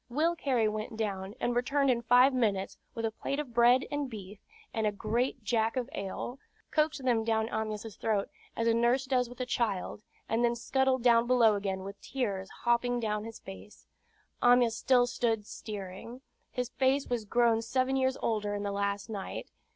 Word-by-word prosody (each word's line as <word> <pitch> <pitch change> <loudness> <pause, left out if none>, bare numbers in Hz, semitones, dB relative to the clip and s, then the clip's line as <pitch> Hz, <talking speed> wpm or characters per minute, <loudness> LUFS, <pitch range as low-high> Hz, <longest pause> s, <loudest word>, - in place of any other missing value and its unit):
Will 315 +7 +1
Cary 255 -8 +1
went 215 +1 -4
down, 200 -2 -3
and 240 - 0
returned 275 +2 +2
in 235 -1 0
five 245 +3 +5
minutes, 205 -6 0 0.2
with 230 - -2
a 225 - 0
plate 275 +5 -3
of 275 -5 -5
bread 240 +2 +5
and 290 -2 -2
beef, 205 -3 -9 0.3
and 220 -1 0
a - - +1
great 230 +4 -1
jack 225 +1 +1
of 255 +1 -2
ale, 200 +6 -5 0.3
coaxed 305 -3 +1
them 235 -3 +2
down 220 -1 +1
Amyas' 215 -1 -4
throat, 210 -3 0 0.3
as 230 - 0
a 230 - +4
nurse 240 +3 +2
does 250 -2 +1
with 245 - -12
a 255 - -1
child, 210 -6 -1 0.3
and 230 +2 +1
then 240 0 +2
scuttled 260 +1 +1
below 235 -1 +5
again 195 -2 -2
with 195 +1 -9
tears 200 -8 -3
hopping 240 +1 +2
down 210 -2 -2
his 225 0 -8
face. 95 +2 -12 0.6
Amyas 245 -2 +5
stood 245 0 +3
still 225 -3 +1
steering. 205 +4 -8 0.3
His 250 -1 -3
face 265 +2 +1
was 240 -3 -1
grown 230 +1 +3
seven 255 +3 0
years 260 0 +1
older 210 -2 0
in 205 - -3
the 200 - -2
last 200 0 -2
night. 205 -3 -6
235 Hz, 180 wpm, -30 LUFS, 210-250 Hz, 0.6 s, five